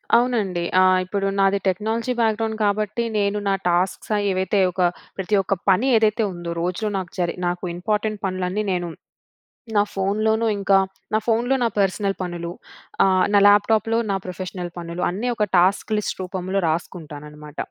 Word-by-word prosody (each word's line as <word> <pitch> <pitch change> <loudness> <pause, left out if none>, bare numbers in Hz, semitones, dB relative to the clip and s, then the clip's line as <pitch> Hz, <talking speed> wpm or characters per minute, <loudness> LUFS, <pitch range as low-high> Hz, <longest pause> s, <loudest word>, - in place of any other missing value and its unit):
అవునండి 215 -8 +1 0.2
ఆహ్, 185 0 +5
ఇప్పుడు 195 +1 -1
నాది 195 0 +3
టెక్నాలజీ 220 +6 -1
బ్యాక్‌గ్రౌండ్ 220 0 0
కాబట్టి 210 +2 0
నేను 200 0 +1
నా 195 - +3
టాస్క్స్ 180 +4 0 0.2
ఏవైతే 190 +2 0
ఒక 185 +1 -3 0.4
ప్రతి 200 +2 +1
ఒక్క 195 +1 -1 0.2
పని 225 +9 +2
ఏదైతే 220 +1 +2
ఉందో 175 -1 -5
రోజులో 185 +5 -2
నాకు 185 -2 -5
జరి 175 -1 0
నాకు 175 +1 -3
ఇంపార్టెంట్ 210 +3 -2
పనులన్నీ 185 +2 -2
నేను 175 -1 -1 0.9
నా 205 - +6
ఫోన్‌లోనూ 215 +3 +1
ఇంకా 195 0 +4 0.4
నా 215 - +5
ఫోన్‌లో 240 +3 +2
నా 235 - +3
పర్సనల్ 195 0 +1
పనులు 175 -1 -4 0.5
ఆహ్, 185 -1 +3
నా 205 - +7
ల్యాప్టాప్‌లో 215 +2 +4
నా - - +1
ప్రొఫెషనల్ 180 -1 -6
పనులు 170 0 -5
అన్నీ 200 +8 -3
ఒక 220 -3 0
టాస్క్ 185 +5 +3
లిస్ట్ 210 - -2
రూపంలో 185 +1 -2
రాసుకుంటానన్నమాట. 150 -2 -5
195 Hz, 150 wpm, -22 LUFS, 180-215 Hz, 0.9 s, నా